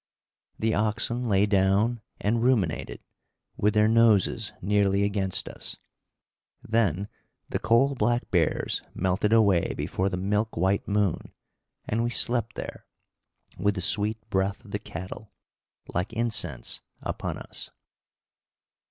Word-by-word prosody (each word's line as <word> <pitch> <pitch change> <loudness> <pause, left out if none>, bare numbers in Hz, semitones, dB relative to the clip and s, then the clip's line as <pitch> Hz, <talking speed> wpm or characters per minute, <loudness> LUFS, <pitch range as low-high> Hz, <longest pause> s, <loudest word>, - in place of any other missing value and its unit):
The 110 0 +1
oxen 115 +3 0
lay 100 0 +4
down 100 +3 +2 0.2
and 115 +3 +1
ruminated, 110 - 0 0.5
with 105 +1 +1
their 105 0 +5
noses 115 -1 +3
nearly 100 0 +2
against 100 -2 -1
us. - - -7 0.9
Then 100 -4 +1 0.4
the - - -1
coal 135 +5 +3
black 120 0 0
bears 85 -4 +1
melted 95 +3 +1
away 100 -6 +4
before 95 +1 -1
the 90 - -3
milk 105 +4 -1
white 95 +3 +1
moon, 100 -3 0 0.6
and 115 +2 0
we 120 - 0
slept 120 0 +2
there, - - -7 0.7
with 100 +2 +2
the 95 - -3
sweet 105 +4 +2
breath 95 +4 0
of 100 - -13
the 105 - -2
cattle, 95 +2 -8 0.6
like 90 +6 -2
incense, 100 - -2 0.2
upon - - -3
us. - - -7
105 Hz, 125 wpm, -27 LUFS, 95-115 Hz, 0.9 s, their